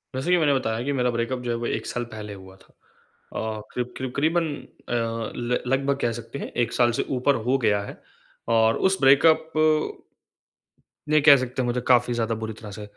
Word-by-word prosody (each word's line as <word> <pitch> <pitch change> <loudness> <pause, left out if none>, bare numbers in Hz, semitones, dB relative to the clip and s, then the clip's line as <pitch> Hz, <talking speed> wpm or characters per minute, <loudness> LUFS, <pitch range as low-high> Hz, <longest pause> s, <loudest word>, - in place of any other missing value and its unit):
जैसे 135 +7 -1
कि 180 - +5
मैंने 150 -4 +3
बताया 115 -3 -1
कि 145 - -1
मेरा 125 -2 +1
ब्रेकअप 115 +2 -2
जो 120 - -2
है 115 - -1
वो 120 - -4
1 - - -2
साल 120 - -3
पहले 105 -1 -7
हुआ 95 -1 -13
था। - - -24 0.6
अ, 110 -1 -3
करीब-करीब 125 +1 -4
करीबन 165 +4 +1 0.4
अ, - - -2
ल 115 +1 -2
लगभग 135 +1 +1
कह 120 - +1
सकते 140 +5 -9
हैं, - - -6
1 120 -1 -1
साल 120 -1 +3
से - - +2
ऊपर 140 +3 +2
हो 135 +2 +3
गया 105 -1 +2
है। - - -10 0.5
और 110 0 +3
उस 190 - -1
ब्रेकअप 160 +4 +5 1.6
ये 155 - +5
कह 145 -1 +8
सकते 130 0 -3
हैं - - -1
मुझे 120 0 -1
काफ़ी 125 -1 +4
ज़्यादा 115 -1 -1
बुरी 110 - -4
तरह 105 -3 -9
से 105 +1 -8
120 Hz, 205 wpm, -24 LUFS, 115-135 Hz, 1.6 s, कह